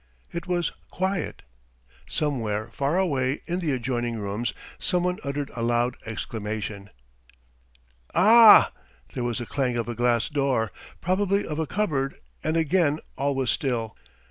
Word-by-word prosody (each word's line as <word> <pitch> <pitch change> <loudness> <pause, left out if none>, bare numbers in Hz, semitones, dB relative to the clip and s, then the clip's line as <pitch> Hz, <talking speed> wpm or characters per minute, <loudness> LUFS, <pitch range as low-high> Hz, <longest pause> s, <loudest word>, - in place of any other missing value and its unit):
It 170 +2 -5
was 175 -1 0 0.2
quiet.... 190 -2 -2 0.7
Somewhere 115 -8 -1
far 140 +5 0
away 140 -7 0
in 175 +1 -2
the 165 -5 0
adjoining 120 -2 -1
rooms 105 +3 -2 0.3
someone 180 0 0
uttered 140 0 -3
a 120 - -3
loud 120 +1 +1
exclamation: 105 -2 -4 1.3
"Ah!" 220 +4 +8 0.4
There 125 - -3
was 120 0 -1
a 120 - -4
clang 125 -1 -1
of 115 - -2
a 120 - -2
glass 120 -1 +2
door, 135 -8 0 0.3
probably 200 +2 +1
of 150 0 -4
a 160 - -1
cupboard, 145 -8 -1 0.3
and 155 +1 +1
again 160 -1 +2 0.2
all 140 +1 0
was 130 -2 +1
still. 115 -5 -1
135 Hz, 140 wpm, -26 LUFS, 120-170 Hz, 1.3 s, Ah